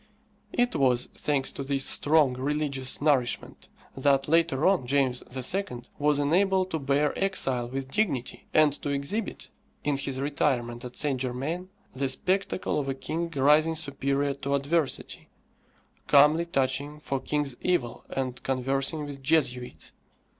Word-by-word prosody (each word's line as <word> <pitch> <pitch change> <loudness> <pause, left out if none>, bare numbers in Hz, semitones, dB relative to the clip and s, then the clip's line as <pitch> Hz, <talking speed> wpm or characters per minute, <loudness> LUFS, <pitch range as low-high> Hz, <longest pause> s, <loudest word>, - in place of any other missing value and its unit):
It 245 -4 +1
was, 125 -4 +2
thanks 140 -3 0
to - - -7
this 135 0 0
strong 150 -3 +3
religious 140 0 -2
nourishment, 135 -5 0 0.3
that, 135 0 +2
later 160 -3 +2
on, 185 -10 +3
James 130 -2 +1 0.3
II. 155 -12 -3 0.2
was 145 0 +3
enabled 185 +5 +2
to 160 - -1
bear 140 +1 +1
exile 130 -11 0
with 135 +1 -5
dignity, 145 - -1
and 155 -2 +4
to - - -3
exhibit, 140 +10 -3 0.3
in 145 -1 0
his 135 -1 -4
retirement 130 -4 -1
at 125 -1 -8
Saint 140 -4 0
Germain, 140 +9 -3 0.2
the 135 0 -1
spectacle 185 +5 0
of 135 -2 -3
a 135 - -1
king 165 +5 -3
rising 150 +4 +4
superior 140 -1 0
to 140 0 -2
adversity, 145 +1 -1 0.8
calmly 150 +4 +5
touching 140 0 -1
for 140 -2 -3
king's 145 -2 -2
evil, 175 -10 -1
and 130 -2 -3
conversing 135 +4 -1
with 140 -1 -8
Jesuits. 130 -4 0
140 Hz, 140 wpm, -27 LUFS, 135-155 Hz, 0.8 s, calmly